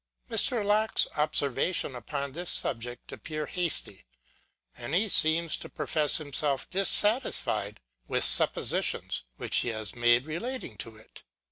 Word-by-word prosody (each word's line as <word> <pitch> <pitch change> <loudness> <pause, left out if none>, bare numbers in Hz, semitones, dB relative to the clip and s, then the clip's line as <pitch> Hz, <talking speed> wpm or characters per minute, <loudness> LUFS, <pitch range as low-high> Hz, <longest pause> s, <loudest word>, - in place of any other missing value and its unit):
Mr. 230 -5 +2
Locke's 215 +2 +1
observations 150 +1 -2
upon 140 +3 -8
this 175 +4 -7
subject 120 0 -2
appear 155 -1 -8
hasty: 165 - -4 0.7
and 120 +6 -7
he 210 +5 -1
seems 165 -3 +3
to - - -12
profess 155 -3 +1
himself 145 -2 -2
dissatisfied 205 +5 +3 0.3
with - - +1
suppositions, - - +4
which - - -1
he - - -1
has 110 -3 -7
made 120 +1 0
relating 235 +12 -8
to 115 -2 -7
it. 110 - -18
150 Hz, 125 wpm, -25 LUFS, 120-180 Hz, 0.7 s, suppositions